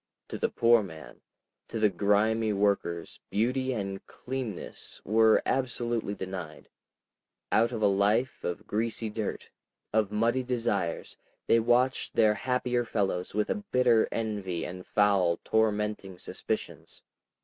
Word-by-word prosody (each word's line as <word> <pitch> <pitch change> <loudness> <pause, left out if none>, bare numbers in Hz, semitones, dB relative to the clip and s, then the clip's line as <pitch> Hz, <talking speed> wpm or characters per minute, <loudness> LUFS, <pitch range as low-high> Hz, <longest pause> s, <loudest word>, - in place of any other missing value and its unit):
To - - -5
the - - +1
poor 115 0 +4
man, 80 -6 -10 0.5
to 115 - -4
the 105 -1 +4
grimy 105 +3 +2
workers, 100 -4 -1
beauty 130 +5 0
and 100 -5 -4
cleanness 125 -7 -6
were 110 +1 +4
absolutely 120 -5 -1
denied; 90 -5 -7 0.8
out 115 +2 +3
of 115 -3 -3
a - - +6
life 105 +6 +2
of 95 +5 -4
greasy 110 +1 -2
dirt, 105 -1 -4 0.4
of 105 -2 +2
muddied 120 +4 +1
desires, 105 -9 -2 0.3
they 115 - +4
watched 120 +3 +1
their 110 -2 +5
happier 125 +1 0
fellows 100 -5 -2
with 105 0 +1
a 205 - -3
bitter 120 -3 +4
envy 100 -6 -3
and 90 +1 -8
foul, 100 -5 +3
tormenting 105 -3 0
suspicions. - - -6
110 Hz, 125 wpm, -29 LUFS, 100-120 Hz, 0.8 s, a